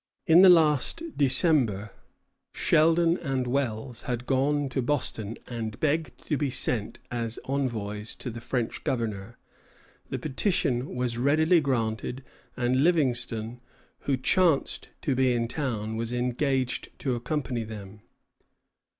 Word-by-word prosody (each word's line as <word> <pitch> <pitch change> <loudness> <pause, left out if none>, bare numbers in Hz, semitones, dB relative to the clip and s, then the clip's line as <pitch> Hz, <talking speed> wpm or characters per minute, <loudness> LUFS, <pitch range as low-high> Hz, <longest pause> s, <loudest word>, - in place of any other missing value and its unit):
In 165 +2 +7
the 190 - +9
last 160 - +4
December, 130 - +2 0.6
Sheldon 165 +2 +3
and 135 -5 -1
Wells 120 -2 -2
had 125 0 -4
gone 140 +2 +1
to 130 +1 -1
Boston 115 -5 -2
and 115 -2 -5
begged 155 0 0
to 150 - 0
be 145 -1 0
sent 120 -4 0
as 115 -1 -2
envoys 110 -6 -2
to 125 - -5
the 120 +1 -8
French 120 -1 -3
governor. 115 -3 -3 0.7
The - - -2
petition 135 - -1
was 125 -1 -2
readily 160 +6 +4
granted, 125 -1 -2 0.3
and 125 +2 +2
Livingston, 125 -8 0 0.4
who 135 -2 -1
chanced 165 +3 +1
to 140 - +1
be 130 -1 +2
in 120 -1 0
the 115 - -4
town, 110 -7 -3
was 115 +1 -2
engaged 125 +2 -1
to 130 - -1
accompany 125 -1 -2
them. 105 -2 -9
125 Hz, 130 wpm, -27 LUFS, 115-145 Hz, 0.7 s, the